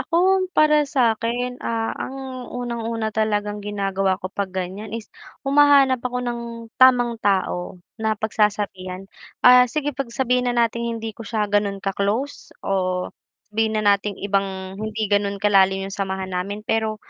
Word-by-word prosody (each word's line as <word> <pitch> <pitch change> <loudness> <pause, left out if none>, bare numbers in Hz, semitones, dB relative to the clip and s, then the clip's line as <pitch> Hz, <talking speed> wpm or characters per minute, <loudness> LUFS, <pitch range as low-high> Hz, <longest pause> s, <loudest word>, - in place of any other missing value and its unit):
Ako 370 +2 +2
para 300 -1 +4
sa 255 -5 +3
akin, 245 +3 -3
ah, 225 -1 -2
ang 260 -1 -6
unang-una 230 -2 -3
talagang 210 -1 -1
ginagawa 195 -2 -1
ko 185 +1 -7
pag 200 -1 -2
ganiyan, 190 +3 -5
is 220 -3 -10 0.3
humahanap 275 -2 +5
ako 250 0 -3
ng 240 -1 -3 0.4
tamang 245 -3 +5
tao 190 -3 0 0.2
na 220 -1 0
pagsasabihan, 205 -3 -1 0.4
ah, 250 0 +8
sige 290 +3 -2
'pag 270 -1 -4
sabihin 250 +1 0
na 245 - -1
nating 235 0 -3
hindi 225 0 -5
ko 220 - -17
siya 220 -2 0
gano'n 205 -1 0
ka-close, 205 +8 -2
o 185 -2 -1 0.4
sabihin 220 0 +1
na 215 - 0
nating 200 0 -2
ibang 195 -1 -2
hindi 215 0 -2
ganun 200 0 +1
kalalim 195 -1 +3
yung 195 - -7
samahan 190 -1 -3
namin, 200 +4 -3
pero 220 -1 0
220 Hz, 150 wpm, -22 LUFS, 195-245 Hz, 0.4 s, ah